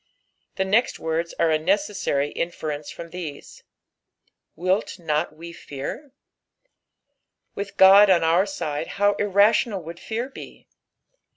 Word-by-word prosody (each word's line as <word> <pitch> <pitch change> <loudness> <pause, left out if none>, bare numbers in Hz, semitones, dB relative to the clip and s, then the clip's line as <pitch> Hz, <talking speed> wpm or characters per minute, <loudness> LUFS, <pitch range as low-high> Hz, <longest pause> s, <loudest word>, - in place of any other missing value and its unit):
The 190 - 0
next 215 +6 +2
words 165 +1 -3
are 165 - +2
a 155 - +2
necessu? 195 -5 0
inference 150 -3 -4
from 170 -1 -9
these. 165 -5 -8 0.5
" - - -48
WiU 185 +5 -1
not 160 -2 -1
«w 170 +3 -11
fectr.'" 155 - -7 1.4
With 200 0 -7
Ood 195 +2 +8
on 175 -3 +4
our 170 +4 +3 0.2
aide, 150 0 -3
how 205 0 +3
imtional 205 0 +2
would 165 +2 -9
fear 230 +3 -4
be 270 - -12
175 Hz, 125 wpm, -23 LUFS, 160-200 Hz, 1.4 s, Ood